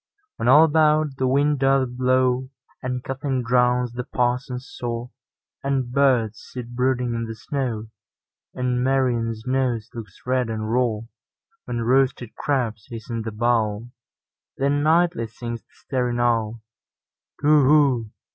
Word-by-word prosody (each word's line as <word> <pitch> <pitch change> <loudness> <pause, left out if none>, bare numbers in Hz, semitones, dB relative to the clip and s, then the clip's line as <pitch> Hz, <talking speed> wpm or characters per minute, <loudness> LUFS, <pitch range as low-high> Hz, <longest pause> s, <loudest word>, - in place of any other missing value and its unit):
When - - -2
all 155 - +8
about 155 -2 +3
the 130 - +1
wind 140 +2 +2
doth 135 -1 +3
blow, 130 +1 +1 0.3
And 125 -1 -3
coughing 135 -1 -2
drowns 125 0 +2
the 125 +1 -4
parson's 125 +1 -2
saw, 120 0 -5 0.5
And 135 -3 -1
birds 125 -5 +2
sit 125 -2 -8
brooding 125 -1 0
in 115 0 -2
the 115 - -6
snow, 125 -5 -3 0.7
And 125 -1 0
Marian's 120 -4 0
nose 125 -4 -1
looks 110 -5 -9
red 125 -2 0
and 110 -1 -3
raw; 120 -4 +1 0.6
When 120 -1 -3
roasted 125 -1 +1
crabs 115 -7 -2
hiss 115 -1 -8
in 115 -1 -2
the 110 0 -4
bowl—Then 120 +5 -2
nightly 165 -4 +2
sings 115 +1 -6
the - - -50
staring 125 -3 -2
owlTu 115 -2 +1 0.9
whoo! 145 -5 +4
125 Hz, 130 wpm, -23 LUFS, 115-135 Hz, 0.9 s, all